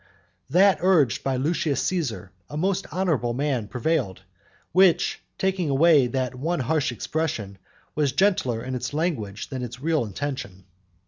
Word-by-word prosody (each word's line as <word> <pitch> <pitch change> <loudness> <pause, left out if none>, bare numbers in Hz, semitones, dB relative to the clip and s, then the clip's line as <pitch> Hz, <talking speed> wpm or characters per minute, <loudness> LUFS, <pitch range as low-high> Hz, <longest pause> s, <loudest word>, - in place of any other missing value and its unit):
That 190 +6 +5
urged 165 - +3
by 135 -1 0
Lucius 145 +1 0
Caesar, 130 - -2 0.2
a 150 - -6
most 195 +3 0
honourable 155 -11 0
man, 135 -5 -1
prevailed, 120 - -1 0.5
which, 185 -1 +3 0.2
taking 190 -4 0
away 145 -1 +5
that 130 +1 -2
one 150 +5 -2
harsh 150 +1 0
expression, 115 -6 -3 0.3
was 150 -3 +1
gentler 140 - +1
in 130 - -5
its 125 +3 -4
language 115 - -2
than 130 -2 -4
in - - -2
its 120 +2 -11
real 155 -1 +1
intention. 105 -4 -5
140 Hz, 145 wpm, -24 LUFS, 120-165 Hz, 0.5 s, That